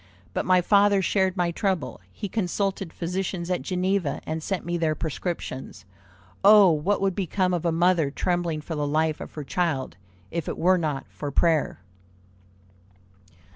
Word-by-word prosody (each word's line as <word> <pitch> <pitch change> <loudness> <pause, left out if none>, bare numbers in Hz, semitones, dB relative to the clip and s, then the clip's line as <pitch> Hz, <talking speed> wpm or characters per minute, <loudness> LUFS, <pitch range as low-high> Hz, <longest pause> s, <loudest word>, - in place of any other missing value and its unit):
But - - -2
my 185 -1 +5
father 200 +1 +4
shared 190 0 +1
my 175 -1 +1
trouble; 170 - -2
he 205 - -5
consulted 195 -2 -2
physicians 180 0 -3
at 180 - 0
Geneva, 185 -4 -1
and 160 +1 -3
sent 190 +2 -3
me 175 0 -2
their 160 -2 0
prescriptions. 160 - -5 0.6
Oh, 205 -2 +8
what 165 +7 0
would 195 -1 +1
become 185 0 0
of 175 -1 -2
a 170 - +2
mother 170 -2 +2
trembling 170 +1 -1
for 160 - -6
the 150 -2 -1
life 155 +1 0
of - - -9
her 150 - -5
child, 150 - -2 0.3
if 170 0 -3
it - - -4
were 185 +2 +3
not 150 -4 -2
for 145 - -6
prayer!" 155 - +1
175 Hz, 160 wpm, -25 LUFS, 155-190 Hz, 0.6 s, Oh